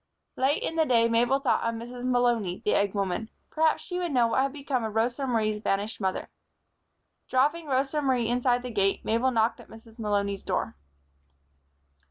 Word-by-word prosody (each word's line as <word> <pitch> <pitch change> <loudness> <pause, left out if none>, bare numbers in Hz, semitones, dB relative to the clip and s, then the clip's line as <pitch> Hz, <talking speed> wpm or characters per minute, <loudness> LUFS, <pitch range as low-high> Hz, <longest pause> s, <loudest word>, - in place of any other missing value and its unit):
Late 270 +3 +1
in 325 - -3
the 320 - +4
day 230 -2 +4
Mabel 240 +3 +3
thought 275 -3 +1
of 230 0 -1
Mrs. 245 +2 -7
Malony, 240 -7 +1
the - - +2
egg 200 0 +1
woman. 200 +3 -2 0.2
Perhaps 320 0 +2
she 360 -1 -4
would 350 -2 -2
know 245 -3 +3
what 260 - +2
had 275 0 0
become 275 -3 -2
of 220 -1 -4
Rosa 240 +4 0
Marie's 215 -3 0
vanished 205 +1 -2
mother. 190 -1 -2 1.0
Dropping 295 +5 +1
Rosa 275 +2 0
Marie 255 -4 +1
inside 245 +1 +1
the 250 - -5
gate, 195 -2 0
Mabel 230 +4 +2
knocked 230 -1 +1
at 240 - -14
Mrs. 225 +1 -15
Malony's 200 -2 -1
door. - - -2
240 Hz, 180 wpm, -27 LUFS, 220-265 Hz, 1.0 s, the